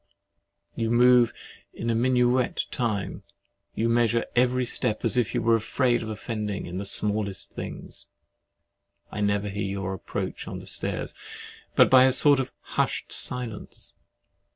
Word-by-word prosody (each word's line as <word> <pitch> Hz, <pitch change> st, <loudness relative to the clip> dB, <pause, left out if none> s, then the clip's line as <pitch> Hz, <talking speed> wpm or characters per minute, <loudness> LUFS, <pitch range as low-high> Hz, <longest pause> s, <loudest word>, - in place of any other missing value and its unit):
You 115 Hz, -1 st, -1 dB
move 120 Hz, 0 st, +5 dB, 0.4 s
in -, -, -7 dB, 0.2 s
minuet 125 Hz, 0 st, +2 dB
time: 110 Hz, -5 st, -2 dB, 0.5 s
you 115 Hz, -, 0 dB
measure 115 Hz, 0 st, +2 dB
every 125 Hz, +1 st, +2 dB
step, 120 Hz, -2 st, -1 dB
as -, -, +2 dB
if 125 Hz, -1 st, +1 dB
you 120 Hz, -, 0 dB
were 115 Hz, 0 st, +3 dB
afraid 120 Hz, +2 st, +1 dB
of 110 Hz, -, -5 dB
offending 105 Hz, -2 st, -4 dB
in 90 Hz, +2 st, -5 dB
the 100 Hz, -, -4 dB
smallest 100 Hz, 0 st, +1 dB
things. -, -, -6 dB, 1.0 s
I 105 Hz, -, -4 dB
never 100 Hz, 0 st, 0 dB
hear 100 Hz, +1 st, -4 dB
your 95 Hz, -1 st, -3 dB
approach 95 Hz, -, -5 dB
on -, -, -5 dB
the -, -, -10 dB
stairs, -, -, -2 dB, 0.6 s
but -, -, +5 dB
by 130 Hz, -1 st, +8 dB
a 130 Hz, -, +4 dB
sort 140 Hz, +2 st, +5 dB
of 130 Hz, -1 st, -3 dB
hushed -, -, -2 dB
silence. 120 Hz, -4 st, 0 dB
115 Hz, 145 wpm, -26 LUFS, 105-125 Hz, 1.0 s, by